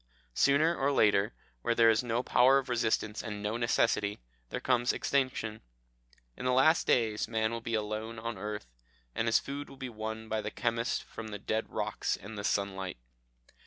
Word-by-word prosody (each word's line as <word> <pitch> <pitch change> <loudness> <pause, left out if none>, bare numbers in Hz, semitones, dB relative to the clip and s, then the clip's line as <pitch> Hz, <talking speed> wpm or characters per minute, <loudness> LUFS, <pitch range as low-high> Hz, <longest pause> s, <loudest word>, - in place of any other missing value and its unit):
Sooner 155 - +4
or 140 -1 +1
later, 105 -4 +3 0.3
where 120 0 +1
there 115 -1 +6
is 110 +3 +1
no 120 +1 0
power 130 +2 +5
of 135 -1 -2
resistance 110 -2 0
and 105 -3 -6
no 105 +2 -1
necessity, 115 -3 +1 0.3
there - - -3
comes 125 -1 +2
extinction. 125 -5 -1 0.7
In - - -8
the 125 - +2
last 155 +6 +4
days 110 -3 +2
man 110 0 0
will 115 0 -4
be 115 0 -2
alone 110 +1 -3
on 115 +1 -3
the 95 - -11
earth, 105 -4 -4 0.5
and 115 - -1
his 115 - +5
food 140 +1 -5
will 135 - -12
be 130 -1 -5
won 110 0 -5
by 110 0 -1
the - - -3
chemist 115 0 -1
from 115 - -8
the 105 -1 -5
dead 110 +2 -2
rocks - - -2
and 105 +3 -9
the 100 - -5
sunlight. 95 -4 -1
115 Hz, 190 wpm, -31 LUFS, 110-125 Hz, 0.7 s, there